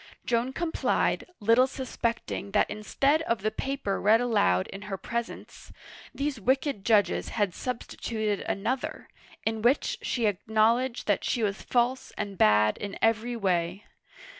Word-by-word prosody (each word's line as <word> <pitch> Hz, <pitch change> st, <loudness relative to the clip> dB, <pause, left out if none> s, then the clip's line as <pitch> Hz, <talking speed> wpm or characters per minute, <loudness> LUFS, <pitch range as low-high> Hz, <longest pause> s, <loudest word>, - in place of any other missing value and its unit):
Joan 235 Hz, +2 st, +1 dB
complied, 325 Hz, +4 st, 0 dB
little 230 Hz, +4 st, +4 dB
suspecting 235 Hz, -6 st, -3 dB
that -, -, +2 dB
instead 275 Hz, +8 st, +1 dB
of 230 Hz, -10 st, -1 dB
the 215 Hz, -, +1 dB
paper 265 Hz, -4 st, -2 dB
read 215 Hz, +3 st, +5 dB
aloud 95 Hz, -, +2 dB
in 195 Hz, -, -9 dB
her 195 Hz, -, -3 dB
presence, 235 Hz, +4 st, -6 dB, 0.4 s
these 280 Hz, -3 st, -3 dB
wicked 260 Hz, -2 st, 0 dB
judges 210 Hz, -2 st, +2 dB
had 205 Hz, -5 st, 0 dB
sub 250 Hz, +2 st, -4 dB
stituted 215 Hz, -3 st, -3 dB
another, 255 Hz, +6 st, -2 dB, 0.4 s
in 220 Hz, 0 st, -1 dB
which 245 Hz, +5 st, +2 dB
she 240 Hz, -3 st, -1 dB
acknowledged 220 Hz, +5 st, +1 dB
that 205 Hz, -, +1 dB
she 235 Hz, -, 0 dB
was 200 Hz, -1 st, -1 dB
false 250 Hz, +1 st, 0 dB
and 205 Hz, -2 st, -4 dB
bad 105 Hz, -, +4 dB
in 200 Hz, -1 st, -5 dB
every 225 Hz, +2 st, +1 dB
way. 180 Hz, -2 st, -1 dB
225 Hz, 140 wpm, -28 LUFS, 200-250 Hz, 0.4 s, read